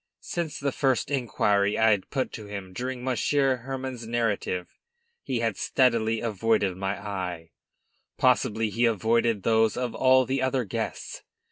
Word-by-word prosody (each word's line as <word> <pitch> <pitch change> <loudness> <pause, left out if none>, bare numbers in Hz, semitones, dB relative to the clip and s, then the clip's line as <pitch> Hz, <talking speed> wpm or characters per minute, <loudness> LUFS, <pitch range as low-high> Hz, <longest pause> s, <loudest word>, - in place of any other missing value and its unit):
Since 170 -3 -3
the 140 0 -1
first 135 +1 0
inquiry 105 -6 +1
I 110 0 +5
had 100 -3 0
put 135 -2 -2
to 105 -2 -8
him 100 -2 -7
during 125 +3 -4
Monsieur 130 +2 +1
Hermann's 130 -1 -6
narrative, 110 -6 -1 0.5
he 125 -3 -2
had 115 -3 -1
steadily 115 -3 +2
avoided 110 -3 +1
my 95 +1 -2
eye. 90 -5 -5 0.7
Possibly 110 0 +2
he 120 +4 +2
avoided 115 -1 +1
those 110 -1 +3
of 125 -2 -2
all 130 0 +4
the 135 +1 -1
other 130 -1 +1
guests. 100 - -5
115 Hz, 145 wpm, -26 LUFS, 105-130 Hz, 0.7 s, I